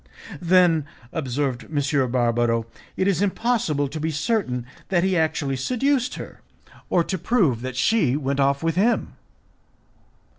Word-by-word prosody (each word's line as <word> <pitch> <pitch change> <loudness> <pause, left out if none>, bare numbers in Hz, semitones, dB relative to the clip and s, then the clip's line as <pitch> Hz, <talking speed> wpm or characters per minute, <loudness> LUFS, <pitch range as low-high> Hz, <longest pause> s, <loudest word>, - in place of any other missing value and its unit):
"Then," 175 -3 +4 0.3
observed 135 -3 -2
M. 140 -3 +1
Barbaro, 120 -2 +1 0.3
"it 185 - +1
is 195 -2 +1
impossible 200 -8 0
to 150 +3 -6
be 160 +1 -1
certain 150 - -1 0.2
that 175 -2 +2
he 190 0 +1
actually 155 -4 0
seduced 255 - 0
her, - - -9 0.5
or 175 - +3
to 190 +1 -3
prove 170 - +1
that 130 0 -5
she 145 - +2
went 140 -1 -2
off 140 +2 +2
with 165 -1 0
him." 225 +5 +1
155 Hz, 140 wpm, -23 LUFS, 135-190 Hz, 0.5 s, Then